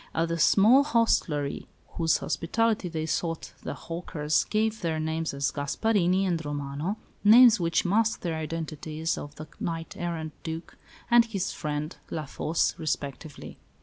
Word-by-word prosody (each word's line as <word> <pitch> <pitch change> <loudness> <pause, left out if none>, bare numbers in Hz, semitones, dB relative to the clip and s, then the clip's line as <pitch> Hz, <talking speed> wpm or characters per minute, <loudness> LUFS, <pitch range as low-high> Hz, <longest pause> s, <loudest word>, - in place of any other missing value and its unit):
At 165 +1 +1
the 165 0 -2
small 225 - +6
hostelry 200 - +1 0.2
whose 165 -2 +1
hospitality 215 +2 0
they 160 -1 -3
sought 165 +1 -3
the - - -5
hawkers 155 -3 -1
gave 220 +1 0
their 160 -2 -1
names 160 +1 -2
as 140 0 -1
Gasparini 185 +5 +1
and 170 -3 -1
Romano, 145 +6 -3 0.3
names 230 +1 +8
which 170 +1 +1
masked 220 +4 +1
the 170 -2 -1
identities 160 0 -3
of 145 0 -8
the 155 - -9
knight 165 -1 -4
errant 165 -3 -4
Duc 165 +1 -6 0.4
and 235 -1 +7
his 200 -5 -3
friend, 150 0 -4
La 155 -1 -4
Fosse, 155 +4 0
respectively. 145 -1 -5
165 Hz, 145 wpm, -27 LUFS, 155-195 Hz, 0.4 s, names